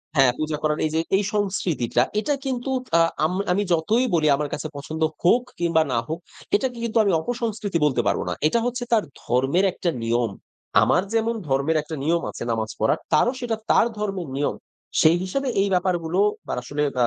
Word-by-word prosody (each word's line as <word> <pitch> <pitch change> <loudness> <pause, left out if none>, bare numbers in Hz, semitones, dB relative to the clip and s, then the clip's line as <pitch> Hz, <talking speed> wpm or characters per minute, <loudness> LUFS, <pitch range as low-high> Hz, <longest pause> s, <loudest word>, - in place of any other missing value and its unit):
হ্যাঁ, 135 -3 +5
পূজা 155 0 -1
করার 150 0 +1
এইযে 160 +1 -1 0.2
এই 205 - +2
সংস্কৃতিটা 185 - 0 0.2
এটা 290 +7 0
কিন্তু 260 0 -2 0.3
আ - - +6 0.2
আম 160 - 0 0.2
আমি 200 +3 +2
যতই 215 +10 +2
বলি 155 -2 +2
আমার 145 +1 -3
কাছে 155 - -3
পছন্দ 155 +3 -6 0.2
হোক 240 +8 +4 0.2
কিংবা 165 -2 +3
না 120 - +1
হোক 160 +2 -3 0.4
এটাকে 250 +1 -1
কিন্তু 230 -1 -1
আমি 200 - +2
অপসংস্কৃতি 220 -3 -2
বলতে 130 -5 +2
পারব - - +1
না। - - -1
এটা 230 +9 +2
হচ্ছে 245 0 -2
তার 215 - +4 0.2
ধর্মের 135 +10 +2
একটা 175 - -1
নিয়ম। 115 -1 +1 0.5
আমার 130 - +3
যেমন 230 +1 +1
ধর্মের 140 +4 +1
একটা 155 +1 -7
নিয়ম 165 +3 +2
আছে - - -7
নামাজ 110 -1 -1
পড়ার 110 - +2
তারও 240 +11 +4
সেটা 240 -3 -1
তার - - +5
ধর্মের 195 -5 -3
নিয়ম। 145 +1 0 0.5
সেই 160 +2 +5
হিসাবে 275 +9 -2
এই 200 - +2
ব্যাপারগুলো 180 -1 0 0.3
বার - - -2
আসলে 145 +4 -2
আ - - -3
আমার - - +5
170 Hz, 190 wpm, -23 LUFS, 145-210 Hz, 0.5 s, আ